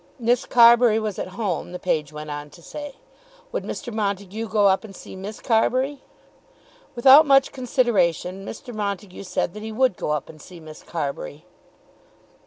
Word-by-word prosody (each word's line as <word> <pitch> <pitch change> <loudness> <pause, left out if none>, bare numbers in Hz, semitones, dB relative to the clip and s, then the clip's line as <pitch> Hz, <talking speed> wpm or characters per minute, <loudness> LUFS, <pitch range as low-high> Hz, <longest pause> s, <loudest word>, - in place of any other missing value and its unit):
Miss 245 0 +1
Carbury 235 -2 +6
was 215 -3 -3
at - - -3
home, 190 -5 -3
the - - -4
page 160 -5 -1
went 150 0 -7
on 145 0 -6
to 170 - -18
say. 290 - -8 0.6
Would - - -3
Mr. 240 -5 -6
Montague 205 +1 -3
go 210 -1 +2
up 190 +2 +2
and 200 -3 -11
see - - -11
Miss 200 +3 -7
Carbury? 255 +4 +1 0.9
Without 265 +5 +8
much 275 -1 +5
consideration 195 - 0
Mr. 240 +4 -8
Montague 200 -3 -4
said 180 -2 -2
that 210 - -8
he 220 +1 -6
would 250 -3 +1
go - - -3
up 150 -2 -1
and 155 -1 -13
see 180 +1 -12
Miss 155 -1 -12
Carbury. 150 0 -5
205 Hz, 170 wpm, -23 LUFS, 180-240 Hz, 0.9 s, Without